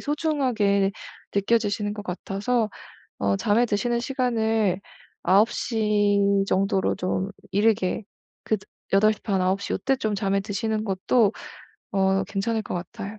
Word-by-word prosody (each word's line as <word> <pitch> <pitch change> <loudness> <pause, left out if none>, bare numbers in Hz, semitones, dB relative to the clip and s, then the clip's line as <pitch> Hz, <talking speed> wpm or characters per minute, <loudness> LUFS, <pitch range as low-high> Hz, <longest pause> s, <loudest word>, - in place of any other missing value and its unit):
소중하게 255 -11 +1 0.4
느껴지시는 205 0 +1
것 210 - -6
같아서 210 +5 -1 0.5
어 100 0 +2
잠에 220 - +3
드시는 235 +2 0
시간을 225 -7 0 0.4
9:00 210 +1 +2 0.3
정도로 195 0 +1
좀 185 +1 -1 0.2
이르게 205 -1 +1 0.4
그 220 - +1 0.4
8 215 +2 +5
시 215 - -15
반 195 -4 0
9:00 190 +2 0
요때 270 +7 +1
좀 215 -4 -1
잠에 195 0 0
드시는 215 +2 -2
것도 200 +2 +2 0.6
어 195 -1 +2
괜찮을 215 +3 -1
것 - - -5
같아요. 205 +4 -6
205 Hz, 230 characters per minute, -25 LUFS, 195-225 Hz, 0.6 s, 8